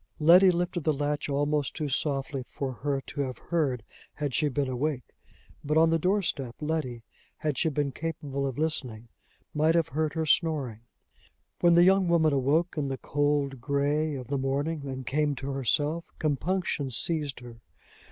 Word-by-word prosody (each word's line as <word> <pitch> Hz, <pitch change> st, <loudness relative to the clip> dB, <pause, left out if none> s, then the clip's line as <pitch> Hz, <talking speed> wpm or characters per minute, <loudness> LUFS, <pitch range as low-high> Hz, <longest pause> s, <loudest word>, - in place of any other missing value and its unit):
Letty 175 Hz, +4 st, +7 dB
lifted 175 Hz, -1 st, -1 dB
the 155 Hz, -, +2 dB
latch 145 Hz, +1 st, -2 dB
almost 145 Hz, -1 st, 0 dB
too 155 Hz, -2 st, -2 dB
softly 135 Hz, -1 st, -1 dB
for 135 Hz, -2 st, -4 dB
her 135 Hz, +2 st, -2 dB
to 145 Hz, -, -5 dB
have 130 Hz, -3 st, -3 dB
heard 140 Hz, -9 st, -1 dB, 0.3 s
had 145 Hz, -3 st, -3 dB
she 150 Hz, +2 st, +2 dB
been 140 Hz, 0 st, -1 dB
awake; 130 Hz, +1 st, -1 dB, 0.6 s
but 150 Hz, +2 st, +1 dB
on 165 Hz, 0 st, +5 dB
the 165 Hz, -, +2 dB
door 195 Hz, +5 st, +2 dB
step 130 Hz, -8 st, -3 dB
Letty, 150 Hz, -7 st, -3 dB, 0.3 s
had 150 Hz, -2 st, -1 dB
she 160 Hz, -, +1 dB
been 145 Hz, -1 st, -1 dB
capable 140 Hz, -3 st, -3 dB
of 130 Hz, -, -5 dB
listening, 125 Hz, -8 st, -2 dB, 0.4 s
might 155 Hz, +2 st, +3 dB
have 165 Hz, -2 st, +2 dB
heard 155 Hz, +2 st, -1 dB
her 160 Hz, -1 st, 0 dB
snoring. 145 Hz, -9 st, +1 dB, 0.8 s
When 175 Hz, -1 st, +5 dB
the 170 Hz, -, +7 dB
young 190 Hz, 0 st, +4 dB
woman 160 Hz, -3 st, +3 dB
awoke 150 Hz, +5 st, +1 dB
in 140 Hz, -, -1 dB
the 135 Hz, -1 st, -3 dB
cold 145 Hz, -2 st, 0 dB
gray 145 Hz, +2 st, 0 dB
of 130 Hz, -2 st, -6 dB
the 140 Hz, +2 st, -2 dB
morning, 140 Hz, +3 st, -2 dB
and 130 Hz, -1 st, -5 dB
came 150 Hz, +1 st, 0 dB
to 135 Hz, +2 st, -5 dB
herself, 145 Hz, +5 st, 0 dB
compunction 155 Hz, -1 st, -1 dB
seized 145 Hz, +1 st, 0 dB
her. 120 Hz, -2 st, -11 dB
145 Hz, 170 wpm, -28 LUFS, 135-160 Hz, 0.8 s, Letty